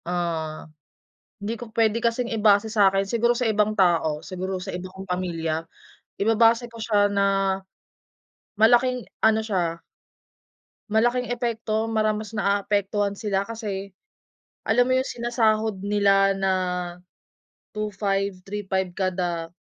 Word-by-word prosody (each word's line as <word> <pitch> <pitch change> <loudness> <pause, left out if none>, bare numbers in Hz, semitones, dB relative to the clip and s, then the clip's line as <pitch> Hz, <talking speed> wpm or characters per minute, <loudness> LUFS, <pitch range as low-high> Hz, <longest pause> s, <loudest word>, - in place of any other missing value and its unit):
Ah. 165 -3 -3 0.7
Hindi 210 +3 -3
ko 240 - -7
pwede 225 0 +2
kasing 235 +1 -1
ibase 215 -1 +3
sa’kin, 195 -2 +4
siguro 235 +3 +2
sa 250 - -1
ibang 215 0 +1
tao, 170 -6 +2
siguro 185 0 -4
sa 190 +1 -6
iba 180 +1 -5
kong 190 +1 -10
pamilya, 165 -3 -2 0.5
ibabase 225 +3 +3
ko 235 - -16
siya 210 -2 +2
na 200 -1 +1 1.4
malaking 245 +2 +4 0.2
ano 220 0 +5
siya. 180 -6 -2 1.1
malaking 240 +3 +1
epekto, 230 -2 -1
parang 225 - -4
mara 215 -1 +2
mas 215 -1 -7
naapektuhan 200 -1 0
sila 200 -2 -1
kasi 200 -4 -5 0.7
alam 245 +2 +3
mo 255 - +2
yung 260 +1 +1
sinasahod 220 -4 0
nila 195 -1 +3
na 195 -1 +1 1.2
2,500, 200 -1 -1
3,500 190 -3 -2
kada 175 -3 -2
205 Hz, 120 wpm, -24 LUFS, 190-225 Hz, 1.4 s, ano